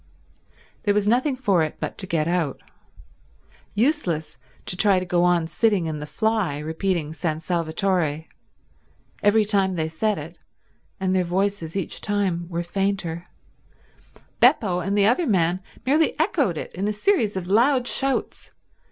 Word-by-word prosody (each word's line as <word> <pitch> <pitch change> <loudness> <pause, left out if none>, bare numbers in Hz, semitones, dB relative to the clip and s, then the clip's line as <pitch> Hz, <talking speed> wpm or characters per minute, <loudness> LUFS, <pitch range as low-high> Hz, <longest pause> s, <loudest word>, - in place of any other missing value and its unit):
There 205 -1 +1
was 210 0 +1
nothing 255 +5 +2
for 205 -9 +2
it 155 -1 -2
but - - -5
to 190 - -2
get 160 -3 0
out. 170 -5 -1 1.2
Useless 205 - 0 0.3
to - - -1
try 195 0 +4
to 185 - -1
go 175 -1 +1
on 175 -2 +3
sitting 205 +1 +1
in 155 -2 -3
the 150 - -6
fly 215 -4 0
repeating 160 +1 -2
San 160 -1 -2
Salvatore. 165 -1 -1 1.0
Every 210 +1 +4
time 195 -3 +1
they 160 -2 -1
said 200 +6 -1
it, 160 +3 -9 0.6
and 190 -1 0
their 185 - +2
voices 180 -1 -2
each 195 -4 -3
time 190 -5 -1
were 170 0 -2
fainter, 180 -2 -2 1.1
Beppo 180 -5 +4
and 195 +3 -1
the 200 - +4
other 250 - +2
man 180 -3 +1 0.2
merely 300 +4 +2
echoed 300 - +1
it - - -6
in 195 +3 -2
a 210 - 0
series 215 - +1
of 185 - -4
loud 245 +7 +3
shouts. 270 0 0
190 Hz, 150 wpm, -23 LUFS, 165-210 Hz, 1.2 s, try